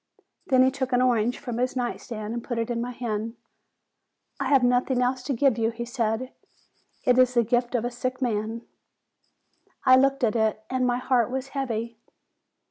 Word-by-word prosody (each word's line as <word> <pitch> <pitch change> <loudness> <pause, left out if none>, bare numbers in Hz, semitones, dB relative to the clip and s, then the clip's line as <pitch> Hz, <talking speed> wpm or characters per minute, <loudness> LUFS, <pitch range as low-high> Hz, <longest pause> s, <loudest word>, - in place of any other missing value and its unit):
Then 260 -2 +5
he 260 - +4
took 260 -1 -3
an 245 - +4
orange 240 -1 +2
from 245 -4 -5
his 255 +1 0
night 245 -2 -2
stand, 215 -2 -6
and 235 -1 -4
put 240 - -4
it 230 +1 -1
in 235 -1 -1
my 245 - -3
hand. 230 -2 -4 1.0
"I - - -1
have 275 -3 +4
nothing 245 +1 +2
else 250 +1 +1
to 275 - -2
give 255 -1 +2
you," 225 0 +2
he 235 +1 -5
said; 235 +1 -2 0.7
"it 250 0 +4
is 255 0 +4
the 235 - +5
gift 240 +2 0
of 235 -1 0
a 245 - -2
sick 255 +1 -3
man." 225 -2 -2 1.2
I 255 - +8
looked 275 0 +3
at 230 -1 +2
it, 220 -1 0
and 255 -1 +1
my 245 0 +1
heart 250 -2 +1
was 265 +1 -4
heavy. 235 -5 -3
245 Hz, 195 wpm, -25 LUFS, 230-255 Hz, 1.2 s, I